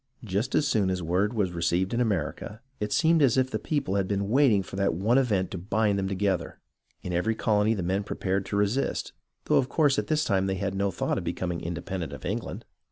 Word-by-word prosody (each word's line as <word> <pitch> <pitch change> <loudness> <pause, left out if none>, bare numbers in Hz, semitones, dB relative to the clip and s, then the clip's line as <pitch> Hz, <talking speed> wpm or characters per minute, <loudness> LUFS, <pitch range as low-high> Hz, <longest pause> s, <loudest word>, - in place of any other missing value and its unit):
Just 110 +5 -1
as 150 - +3
soon 105 -8 +2
as 90 -1 -2
word 90 +5 +1
was 100 -5 +1
received 85 +3 0
in 120 - +1
America, 105 0 -2 0.2
it 105 0 -3
seemed 160 -1 +3
as 135 -3 +4
if 130 0 +2
the - - -1
people 145 -10 -1
had 95 -2 0
been 100 0 -1
waiting 120 -6 +4
for 95 - -9
that 100 -3 +1
one 110 +9 +3
event 105 -8 0
to 95 - -4
bind 105 +2 +1
them 95 - -1
together. 95 -3 -1 0.5
In 90 - -4
every 110 +6 +1
colony 110 0 +2
the 95 - -3
men 95 +3 0
pre - - -6
pared 95 +1 0
to - - -3
resist, 105 +7 0 0.3
though - - +3
of 130 - +1
course 145 -4 +3
at - - -3
this 155 -1 +1
time 95 -7 +1
they 95 - 0
had 95 +1 -2
no 100 +1 0
thought 90 - -1
of - - -7
becoming 85 0 -3
independent 85 -2 -4
of 65 - -9
England. - - -4
100 Hz, 230 wpm, -27 LUFS, 95-115 Hz, 0.5 s, as